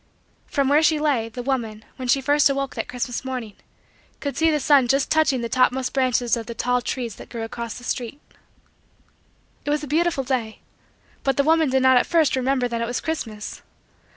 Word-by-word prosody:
From 280 -2 0
where 290 +3 +4
she 315 0 +3
lay, 270 -7 0
the 245 +2 -7
woman, 230 -5 -3
when 255 -2 -5
she 270 +3 +3
first 290 +2 +4
awoke 275 0 -2
that - - -4
Christmas 245 0 -4
morning, 250 -5 -5 0.7
could 285 -1 -4
see 325 0 +3
the 305 -1 +1
sun 275 -3 +4
just 270 +2 +1
touching 310 -5 +3
the 235 - -2
topmost 255 +1 +1
branches 250 -3 +2
of 230 -2 -6
the 235 - -6
tall 250 +2 +1
trees 240 -2 -4
that - - -11
grew 230 -2 -5
across 230 0 -5
the 245 - -11
street. 245 +2 -4 1.4
It - - -4
was 295 0 0
a - - -5
beautiful 320 -1 +1
day. 245 -4 -3 0.6
But 270 -2 0
the 280 - +4
woman 320 0 +3
did 265 0 +2
not 260 -1 +6
at - - +2
first 320 -5 +3
remember 260 -1 +1
that 235 -1 -3
it 230 - -1
was 245 - -2
Christmas. 220 -10 -5
260 Hz, 205 wpm, -23 LUFS, 240-285 Hz, 1.4 s, not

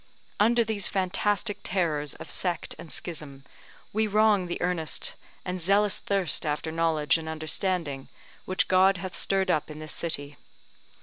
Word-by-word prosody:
Under 235 +3 +5
these 215 -3 0
fantastic 200 +2 0
terrors 155 -6 -1
of - - -9
sect 175 -3 -1
and 160 - -9
schism, 150 -5 -5 0.5
we 220 +1 +2
wrong 210 -3 +3
the 175 - -3
earnest 175 -3 0 0.3
and 180 0 -3
zealous 200 +3 +3
thirst 195 -3 0
after 150 +1 -2
knowledge 165 -1 +2
and 160 0 -6
understanding 155 -2 -2 0.4
which 185 - +1
God 190 +1 +5
hath 185 +1 -6
stirred 195 -1 +1
up 155 - 0
in 150 - -8
this 155 0 -6
city. 145 -4 -1
180 Hz, 145 wpm, -27 LUFS, 155-195 Hz, 0.5 s, Under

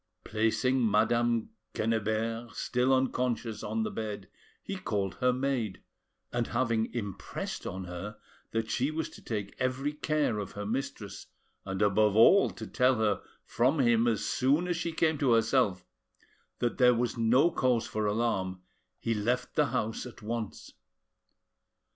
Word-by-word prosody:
Placing 115 +3 +1
Madame 115 +2 +2 0.2
Quennebert, 115 +1 -1
still 125 +1 +1
unconscious, 125 -4 0
on 225 - -1
the 215 - -3
bed, 105 - -5 0.4
he 195 - -4
called 105 - -2
her 125 0 +3
maid, 125 -6 -2 0.5
and, 120 -1 0
having 115 -2 0
impressed 105 -6 -5
on 95 +1 -5
her 90 +4 -7 0.3
that 115 0 -2
she 130 +3 +1
was 160 +1 -3
to - - -13
take 105 -3 -4
every 130 +3 -1
care 150 -7 0
of 100 - -5
her 105 0 -5
mistress, 110 -3 -4 0.4
and 95 +2 -1
above 105 0 +3
all 155 - +7
to 110 - -8
tell 125 +3 +3
her 110 -3 +1 0.2
from 130 +7 +2
him 120 -2 +4
as 115 -3 +1
soon 145 +7 +2
as 175 - 0
she 165 0 -2
came 160 -2 +1
to 130 -4 +3
herself 115 -5 +2 0.7
that 120 +2 -1
there 125 -1 +6
was 120 +1 0
no 125 +8 +4
cause 125 -6 +1
for 110 -1 -2
alarm, 95 -4 -1 0.3
he 115 - -1
left 120 +4 -1
the 150 - +3
house 115 -2 -2
at 115 - -13
once. 115 -1 -5
115 Hz, 150 wpm, -30 LUFS, 105-130 Hz, 0.7 s, all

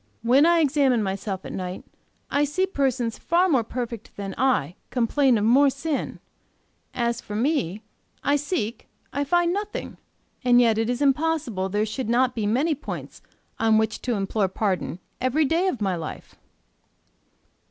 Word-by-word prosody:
When 265 +7 +5
I 340 -1 +4
examine 270 -6 +3
myself 195 0 -3
at - - -6
night, 185 -1 -5 0.5
I 285 - +2
see 295 +6 +1
persons 260 -9 -1
far 345 +2 +2
more 265 -9 +3
perfect 235 -1 -6
than 195 -1 -5
I 245 - +1 0.2
complain 255 +1 +2
of 205 - 0
more 275 +5 +5
sin: 280 +2 -3 0.7
as 235 -1 -1
for 210 - -7
me, 225 - 0 0.4
I 285 +1 +3
seek, 290 - -3 0.3
I 285 - 0
find 345 +4 +2
nothing; 415 +1 -4 0.5
and 245 -1 +5
yet 225 -3 +4
it 225 +1 0
is 245 +3 0
impossible 280 -9 +1
there 210 +2 0
should 220 +2 -4
not 250 +1 +3
be 220 -4 -2
many 275 +10 +2
points 285 - -7 0.4
on 225 -1 +4
which 220 0 0
to 245 -2 -1
implore 195 0 0
pardon 190 -3 -2 0.2
every 265 +5 +2
day 335 +6 +1
of 260 - -2
my 190 -3 +1
life. 160 -3 -7
245 Hz, 160 wpm, -24 LUFS, 215-290 Hz, 0.7 s, When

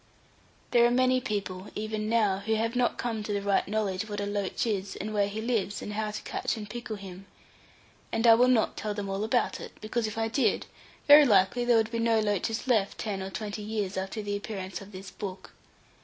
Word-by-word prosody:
There 240 -1 +5
are - - +2
many 255 +1 +3
people, 200 -3 -3
even 215 0 -3
now, 210 -4 +2
who 220 +2 0
have 225 +2 -1
not 245 -1 +1
come 230 -3 -2
to 210 - -4
the 200 -1 0
right 200 -1 +2
knowledge 210 0 -1
what 205 0 -3
a 205 - -1
loach 205 0 -2
is, 200 -3 -2
and 215 +2 -5
where 205 -1 +2
he 210 +2 -4
lives, 220 -4 -1
and 210 - -5
how 215 0 -1
to 210 - -6
catch - - -2
and 210 -1 -6
pickle 235 0 -5
him. 195 -1 -10 0.8
And 225 +1 0
I 230 - +9
will 245 +2 +5
not 250 -3 +3
tell 210 -1 -3
them 205 -1 -4
all 195 +2 -2
about 230 +3 +1
it, - - -9
because 220 +1 -2
if 215 +1 -6
I 225 0 +1
did, 240 +5 +1 0.4
very 295 +1 +10
likely 210 +2 +3
there 240 -1 +5
would 220 0 +1
be 230 - -2
no 230 -1 +3
loaches 215 +2 -1
left 220 -6 +2
ten 200 -3 -3
or 190 - -4
twenty 210 +1 -5
years 210 -2 -3
after 190 +3 -3
the 205 0 -2
appearance 195 -2 -5
of 200 +1 -11
this 190 0 -9
book. 190 -2 -7
215 Hz, 225 wpm, -28 LUFS, 200-225 Hz, 0.8 s, very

